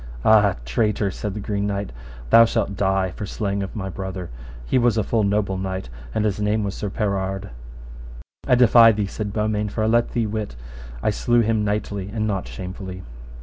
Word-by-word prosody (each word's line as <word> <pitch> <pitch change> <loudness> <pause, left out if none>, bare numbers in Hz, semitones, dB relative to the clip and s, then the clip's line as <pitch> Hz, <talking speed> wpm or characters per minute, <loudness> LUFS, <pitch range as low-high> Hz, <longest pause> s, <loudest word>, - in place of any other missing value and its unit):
Ah! 105 -3 +5
traitor, 100 - 0
said 105 +1 -5
the - - -4
Green 100 0 -2
Knight, 100 -1 -3 0.4
thou 115 - +9
shalt 100 -3 0
die 95 -1 +1
for 105 - -6
slaying 100 -1 -2
of 95 - -5
my 100 -3 -4
brother; 95 -1 -6 0.3
he 130 - +2
was 120 -2 +2
a 110 - +2
full 115 +2 +1
noble 100 -2 0
knight, 95 -6 -4 0.3
and 110 - +1
his 105 -1 0
name 105 +1 +1
was 100 -1 -2
Sir 105 - -4
Perard. 95 -1 -2 1.0
I 125 - +5
defy 120 -1 +7
thee, 105 -1 -1
said 105 +1 -4
Beaumains, 105 -1 -1
for 110 - -1
I - - +2
let 120 +2 +2
thee 115 -2 +1
wit 105 - -4 0.5
I - - +2
slew 120 +3 +2
him 110 -1 +1
knightly 105 -1 -2
and 110 0 -1
not 100 -3 -2
shamefully. 95 0 -7
105 Hz, 190 wpm, -22 LUFS, 95-110 Hz, 1.0 s, thou